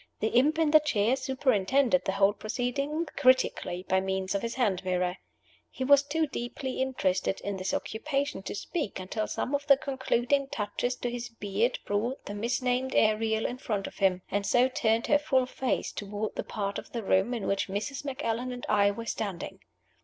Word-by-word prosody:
The 220 - +1
imp 285 +7 +3
in 320 -2 +3
the 310 - +8
chair 245 -5 +2
superintended 265 0 +2
the 195 - 0
whole 195 +1 +4
proceeding 250 +9 -2
critically 255 -9 +2
by 190 0 +2
means 190 0 -2
of 200 - 0
his 235 0 -3
hand 210 -9 +1
mirror. 180 0 0 0.5
He 260 - -5
was 280 +1 +6
too 315 +3 0
deeply 260 -1 -4
interested 195 -8 0
in 200 -1 -3
this 185 0 -2
occupation 280 +2 -2
to - - -5
speak 285 - -3
until 215 +4 -3
some 270 - -3
of 285 0 -1
the 275 -2 +7
concluding 270 -1 0
touches 245 +1 -2
to 245 - -3
his 245 0 -5
beard 220 +1 -1
brought 225 +6 -2
the 205 - -5
misnamed 250 +4 -1
Ariel 220 0 +2
in 250 - -3
front 205 -5 -2
of - - -8
him, 185 -2 +2
and 200 +1 0
so 245 +6 +4
turned 230 -3 +1
her 295 - +4
full 265 -4 +2
face 260 0 -2
toward 205 +1 -4
the - - -3
part 200 -1 -3
of - - -13
the 230 -2 -3
room 190 +4 +2
in 220 - -4
which 195 - 0
Mrs. 215 +9 -3
Macallan 255 -3 -2
and 245 -1 -6
I 205 -1 +4
were 230 +3 -5
standing. 200 -6 -4
235 Hz, 190 wpm, -29 LUFS, 200-265 Hz, 0.5 s, the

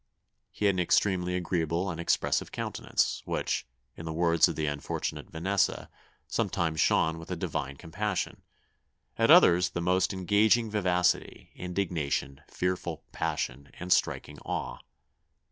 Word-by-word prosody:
He 105 - -3
had 100 - +5
an 95 - -2
extremely 90 0 +2
agreeable 85 0 -1
and 85 0 -5
expressive - - 0
countenance, - - -1
which, - - -2 0.3
in 80 - -9
the 80 - -3
words 85 0 +4
of - - -4
the 80 - -1
unfortunate 75 -1 -3
Vanessa, 95 +4 0 0.3
sometimes 80 -2 -1
shone 80 0 +2
with 80 - -11
a - - -2
divine 70 +1 -4
compassion, 95 +6 -3 0.7
at - - +2
others, 90 +1 +7
the 85 - -4
most 90 +2 +2
engaging 105 +4 +2
vivacity, 90 -4 0
indignation, 80 -6 -2
fearful 90 -2 -2
passion, 75 -4 -3
and 90 +1 +2
striking - - -1
awe. - - -4
90 Hz, 130 wpm, -29 LUFS, 80-95 Hz, 0.7 s, others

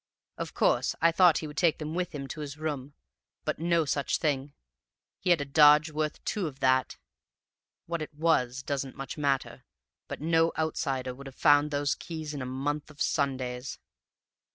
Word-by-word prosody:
Of - - -6
course - - +2
I 165 +1 +4
thought 175 -1 +5
he - - -3
would 150 0 -9
take 170 -4 +3
them 155 0 -5
with 180 0 -2
him 140 -1 -5
to - - -6
his 145 -1 -6
room; 145 -3 -4 0.5
but - - -2
no 170 -1 +2
such 140 -1 0
thing; 140 -2 -1 0.6
he 185 - -2
had 170 -4 +4
a - - -2
dodge 150 +2 +6
worth 155 0 -3
two 205 -6 -1
of 140 -3 -9
that. 130 0 +2 0.9
What 170 -1 -3
it 155 - -5
was 140 -5 +1
doesn't 135 -2 -3
much 135 -1 -6
matter, 135 -3 -1 0.4
but - - -6
no 165 +2 +2
outsider 135 -5 -1
would 140 +2 -11
have 135 - -11
found 145 -1 +4
those 145 -1 0
keys 155 -3 -6
in 140 - -5
a 130 - -4
month 145 +4 -3
of 150 -1 -16
Sundays. 130 -1 -1
145 Hz, 180 wpm, -29 LUFS, 135-160 Hz, 0.9 s, dodge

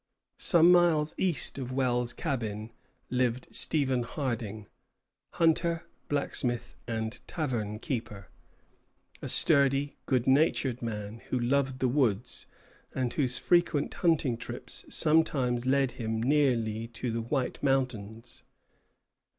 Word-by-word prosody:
Some 170 -1 +5
miles 170 -4 +4
east 165 -7 +1
of 130 -1 -5
Wells's 125 -2 0
cabin 110 -8 -3 0.4
lived 125 -1 0
Stephen 135 -5 +2
Harding, 115 -5 -4 0.7
hunter, 165 0 +2 0.3
blacksmith, 125 -4 -1
and 110 +1 -3
tavern 120 -10 -3
keeper, 110 -5 -5 0.9
a - - -5
sturdy, 140 0 +3
good 130 -2 +1
natured 135 -2 +2
man, 105 -1 -5
who 125 - 0
loved 135 +2 +1
the 130 - +1
woods, 125 -3 0 0.5
and 125 -2 -1
whose 130 -4 +1
frequent 170 -4 +2
hunting 155 -8 +1
trips - - -5
sometimes 135 -6 +2
led 135 -1 +2
him 110 -3 -3
nearly 120 -6 +1
to 120 +1 -4
the 115 +1 -2
White 125 +2 -2
Mountains. 120 -4 -2
130 Hz, 110 wpm, -29 LUFS, 115-145 Hz, 0.9 s, Some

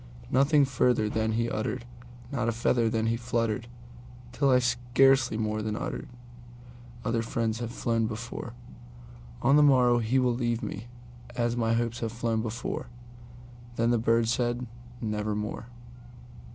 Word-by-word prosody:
Nothing 140 +2 +4
further 125 -4 +2
then 110 +1 0
he 115 +1 +1
uttered, 115 +2 -3 0.5
not 125 -4 0
a - - 0
feather 115 0 +2
then 110 0 0
he 115 +1 +1
fluttered, 115 -2 -1 0.6
Till 140 +3 +1
I 130 - +6
scarcely 125 0 +3
more 110 -1 -1
than 105 0 -2
muttered,—"Other 120 0 -7
friends 115 0 -2
have 120 -1 -4
flown 115 -2 0
before; 115 +1 -6 0.9
On 135 +3 +5
the - - +6
morrow 125 -4 +5
he 115 +3 +1
will 125 -2 +3
leave 120 -1 -1
me, 110 +4 -5 0.5
as 120 -1 0
my 115 -1 +1
Hopes 115 0 -1
have 115 -1 -2
flown 115 -1 -1
before."Then 120 +1 -5
the 120 - +2
bird 115 0 +2
said, 120 +1 0 0.4
"Nevermore." 105 +1 -3
120 Hz, 140 wpm, -28 LUFS, 115-120 Hz, 0.9 s, I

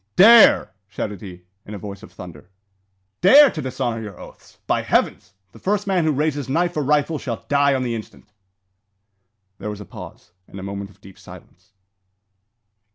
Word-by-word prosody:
"Dare!" 225 - +7
shouted 100 -1 -6
he, 90 -3 -11 0.2
in 105 - -9
a - - -6
voice 100 0 -9
of - - -14
thunder, 90 -2 -12 0.7
"dare 275 +8 +7
to 155 - -5
dishonour 125 -3 -3
your 105 -5 -9
oaths! - - -15
By - - 0
heavens! 95 - -1 0.2
the - - -16
first 205 +1 -1
man 185 -4 +1
who 155 - +2
raises 145 -1 -2
knife 175 +5 0
or 150 - 0
rifle 150 +2 +1
shall 115 -3 -6
die 140 -1 +3
on 130 - -1
the 120 -2 -2
instant!" 110 -1 -9 1.3
There 105 - -5
was 105 -1 -7
a 105 - -9
pause, - - -12 0.2
and 95 - -10
a - - -8
moment 100 0 -6
of 100 -1 -22
deep 95 -1 -15
silence. 95 +4 -16
120 Hz, 175 wpm, -21 LUFS, 100-155 Hz, 1.3 s, Dare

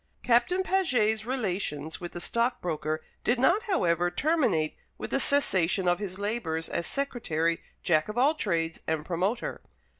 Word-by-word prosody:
Captain 250 +11 +3
Paget's 245 - +1
relations 180 - -2
with 175 - -6
the 175 - -5
stockbroker 170 -9 -1 0.2
did 240 - +2
not, 345 - +3
however, 175 - +2
terminate 235 - +1 0.2
with - - -6
the 270 - +2
cessation 190 -11 +3
of 175 +1 +3
his 190 -3 -5
labours 200 -6 -2
as 170 - -2
secretary, 170 - -1 0.2
jack 155 +1 +2
of 210 - -5
all 275 +5 +4
trades, 165 - -1
and 160 -1 -1
promoter. 185 +8 -2
200 Hz, 145 wpm, -28 LUFS, 165-250 Hz, 0.2 s, all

